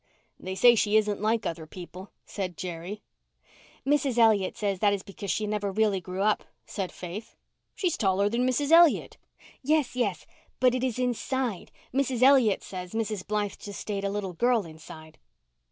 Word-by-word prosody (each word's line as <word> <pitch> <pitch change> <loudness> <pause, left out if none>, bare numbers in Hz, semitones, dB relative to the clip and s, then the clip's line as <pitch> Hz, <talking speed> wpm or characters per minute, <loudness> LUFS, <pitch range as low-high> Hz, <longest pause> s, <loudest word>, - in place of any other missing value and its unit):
"They 185 0 -5
say 240 +6 +7
she 215 -1 +3
isn't 210 -2 0
like 220 +1 +1
other 165 -1 -4
people," 180 +3 -10 0.2
said 185 -5 -5
Jerry. 180 +4 -6 0.8
"Mrs. 275 -3 +1
Elliot 220 -5 +3
says 200 -3 -1
that 205 0 +3
is 200 -1 -3
because 200 -1 -8
she 215 - 0
never 210 -1 -2
really 205 -2 +1
grew 185 +2 -3
up," 215 0 +2 0.2
said 195 -3 -4
Faith. 185 +5 -8 0.4
"She's 360 -4 0
taller 195 -1 +2
than 240 +4 0
Mrs. 285 +4 0
Elliott." 335 -1 +5 0.4
"Yes, 295 -2 +1
yes, 210 -7 -1 0.3
but 255 -1 +4
it 255 0 -1
is 255 -3 -1
inside—Mrs. 255 +1 -2
Elliot 260 -6 +5
says 180 -2 -7
Mrs. 215 -3 -3
Blythe 210 -1 -1
just 205 -1 -8
stayed 200 -2 -4
a 200 - 0
little 200 -2 -3
girl 235 +2 +2
inside." 155 0 -12
210 Hz, 165 wpm, -27 LUFS, 190-245 Hz, 0.8 s, say